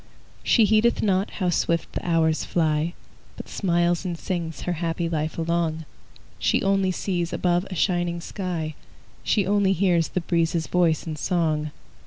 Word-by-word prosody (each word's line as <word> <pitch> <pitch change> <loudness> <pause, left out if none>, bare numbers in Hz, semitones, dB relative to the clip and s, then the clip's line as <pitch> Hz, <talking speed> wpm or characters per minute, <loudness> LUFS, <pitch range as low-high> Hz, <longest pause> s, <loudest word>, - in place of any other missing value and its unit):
She 225 - +4
heedeth 220 +3 +3
not 195 -1 +1
how 180 -3 -1
swift 170 -1 0
the - - -4
hours 160 -2 +2
fly, 160 0 0 0.4
But - - -8
smiles 175 -2 +1
and 175 -3 -3
sings 170 -3 -4
her 180 - -2
happy 170 0 -1
life 155 -1 -2
along; 165 -1 -1 0.5
She - - +1
only 195 -1 +2
sees 175 -2 -2
above 175 +1 +1
a 185 - -5
shining 175 -1 0
sky; 170 -4 -4 0.5
She 205 -3 +2
only 200 -1 +3
hears 175 -3 +2
the 180 - -2
breezes' 165 -1 0
voice 170 -3 +1
in 155 -2 -4
song. 155 -3 0
170 Hz, 155 wpm, -24 LUFS, 165-185 Hz, 0.5 s, She